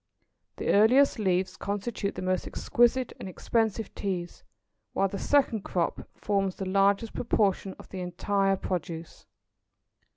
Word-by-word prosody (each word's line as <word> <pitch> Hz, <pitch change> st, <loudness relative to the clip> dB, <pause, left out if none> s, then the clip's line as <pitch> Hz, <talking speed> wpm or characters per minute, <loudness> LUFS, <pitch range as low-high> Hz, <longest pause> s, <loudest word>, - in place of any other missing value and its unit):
The -, -, -3 dB
earliest 235 Hz, +6 st, +5 dB
leaves 185 Hz, -2 st, +1 dB
constitute 200 Hz, 0 st, -3 dB
the -, -, -5 dB
most 185 Hz, 0 st, 0 dB
exquisite 240 Hz, +1 st, +2 dB
and 190 Hz, -, -6 dB
expensive 220 Hz, +2 st, -1 dB
teas; 180 Hz, -4 st, -4 dB, 0.5 s
while 195 Hz, -, +2 dB
the 195 Hz, +1 st, -5 dB
second 270 Hz, -7 st, +2 dB
crop 175 Hz, -3 st, -2 dB
forms 195 Hz, -2 st, 0 dB
the 190 Hz, -, -4 dB
largest 200 Hz, +3 st, +2 dB
proportion 200 Hz, -4 st, 0 dB
of -, -, -14 dB
the 190 Hz, -, -6 dB
entire 195 Hz, +2 st, 0 dB
produce. 170 Hz, -3 st, -5 dB
195 Hz, 130 wpm, -28 LUFS, 185-220 Hz, 0.5 s, earliest